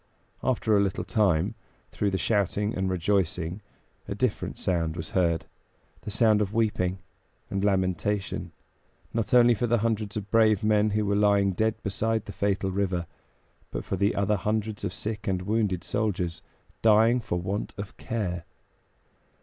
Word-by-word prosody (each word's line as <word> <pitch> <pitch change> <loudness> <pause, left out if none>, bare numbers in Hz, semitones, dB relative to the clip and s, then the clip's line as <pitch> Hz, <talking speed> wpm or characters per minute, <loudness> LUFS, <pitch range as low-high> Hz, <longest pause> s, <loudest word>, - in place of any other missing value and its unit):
After 115 -4 +2
a - - +5
little 100 -2 -1
time, 95 -3 +2 0.4
through 105 - 0
the 95 - -1
shouting 105 +1 0
and 95 0 0
rejoicing 90 0 0 0.5
a - - -3
different - - -1
sound 85 -3 -1
was 80 - -6
heard; 85 -3 +1 0.6
the - - -7
sound 110 0 +3
of 105 0 -2
weeping 95 -5 +1 0.5
and 100 0 -1
lamentation, 95 0 0 0.6
not 115 -2 -1
only 120 -1 +7
for 120 +2 -1
the 120 +1 +3
hundreds 110 -1 -1
of 105 -1 -6
brave 110 -3 +4
men 105 0 +3
who 105 0 0
were 100 0 +1
lying 100 -1 +3
dead 110 +4 +1
beside 110 +2 -1
the - - -7
fatal 95 -1 0
river, 95 -3 -1 0.6
but - - -5
for - - -2
the 100 +1 +1
other 100 +1 +1
hundreds 110 +1 -2
of - - -1
sick 105 +2 -4
and 95 -2 0
wounded 105 -3 0
soldiers, 90 -6 -1 0.4
dying 115 +2 +5
for 90 -6 -2
want 95 +4 -3
of 100 0 -7
care. 90 -7 -3
100 Hz, 160 wpm, -27 LUFS, 95-110 Hz, 0.6 s, only